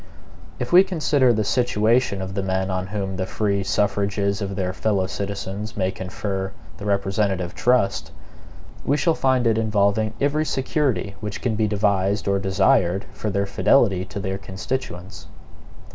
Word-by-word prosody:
If 125 +6 -4
we 185 +2 +9
consider 150 -8 +2
the 110 -2 +1
situation 115 -2 +1
of 95 0 -6
the 100 - -1
men 95 0 -1
on 95 0 -2
whom 95 -1 -3
the 95 0 -2
free 100 -2 0
suffrages 100 +1 0
of 100 -1 -3
their 95 -1 -2
fellow 100 -2 0
citizens 100 +2 -5
may 95 -1 +1
confer 95 +1 -4 0.2
the - - -8
representative 100 -2 0
trust, 125 -5 +1 0.7
we 145 - +1
shall 165 +2 +2
find 130 -4 +1
it 115 -1 +3
involving 105 0 +1
every 145 +2 +1
security 135 -7 -1
which 105 0 -5
can 120 - -1
be 110 0 +1
devised 100 -1 +1
or 100 0 +2
desired 95 -1 +2
for 105 - -3
their 100 0 0
fidelity 100 -1 +3
to 100 - -6
their 95 0 -3
constituents. 95 -2 -5
100 Hz, 155 wpm, -23 LUFS, 95-110 Hz, 0.7 s, we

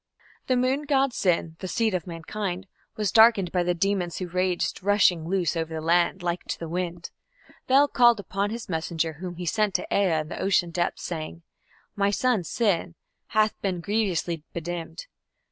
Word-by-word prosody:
The 255 - +2
moon 260 +4 +1
god 275 -3 +2
Sin, 165 -5 0
"the 190 - -5
seed 220 +2 0
of 180 -2 -2
mankind", 180 +2 -4 0.3
was 210 -3 -1
darkened 220 -5 +5
by 180 - +1
the 175 0 0
demons 180 -1 0
who 185 - -4
raged, 180 +1 -1
"rushing 185 -4 +3
loose 180 -2 0
over 165 -1 -2
the - - -2
land" 175 +3 +2
like 175 0 -2
to - - -3
the 165 - -6
wind. 175 0 -4 0.6
Bel 275 +3 +5
called 240 -5 +4
upon 200 +1 -2
his 230 +1 -6
messenger, 165 -1 -2
whom 175 +3 -7
he 175 +1 -6
sent 210 +3 0
to - - +1
Ea 180 -6 +2
in 155 - -9
the - - -6
ocean 180 -3 +2
depths, 175 +1 -2
saying: 165 0 -5 0.5
"My 200 -1 +2
son 220 -1 +1
Sin... 175 -3 0 0.3
hath 215 -1 +2
been 185 -3 -1
grievously 180 -4 -1
bedimmed". 170 - -5
185 Hz, 180 wpm, -26 LUFS, 170-210 Hz, 0.6 s, darkened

